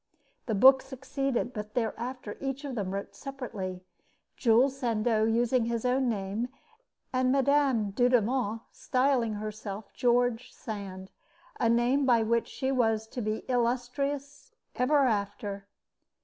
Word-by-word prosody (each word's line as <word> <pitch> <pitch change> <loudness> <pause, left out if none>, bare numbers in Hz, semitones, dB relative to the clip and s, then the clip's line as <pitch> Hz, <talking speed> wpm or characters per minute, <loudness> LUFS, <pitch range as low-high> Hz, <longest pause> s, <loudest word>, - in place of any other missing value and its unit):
The 220 - 0
book 265 +6 +7
succeeded; 265 -1 -3
but 210 -1 -7
thereafter 240 -1 -3
each 275 +1 -3
of 275 - -4
them 205 -6 -2
wrote 195 +1 -5
separately, 215 -10 -6 0.5
Jules 255 +3 +3
Sandeau 230 -4 +1
using 235 +2 +2
his 235 0 -2
own 255 0 +2
name, 210 +3 -2 0.6
and 255 0 +2
Mme. 270 -6 +2
Dudevant 245 -1 +2
styling 255 -3 +1
herself 210 -1 -6
George 245 0 +1
Sand, 195 -4 -7 0.5
a 230 - +3
name 245 +4 +3
by 235 -3 +4
which 230 +1 +1
she 265 -1 -2
was 225 -4 +1
to 245 - -5
be 215 0 -3
illustrious 265 - -2 0.2
ever 280 +2 +3
after. 205 -2 -2
240 Hz, 125 wpm, -29 LUFS, 215-260 Hz, 0.6 s, book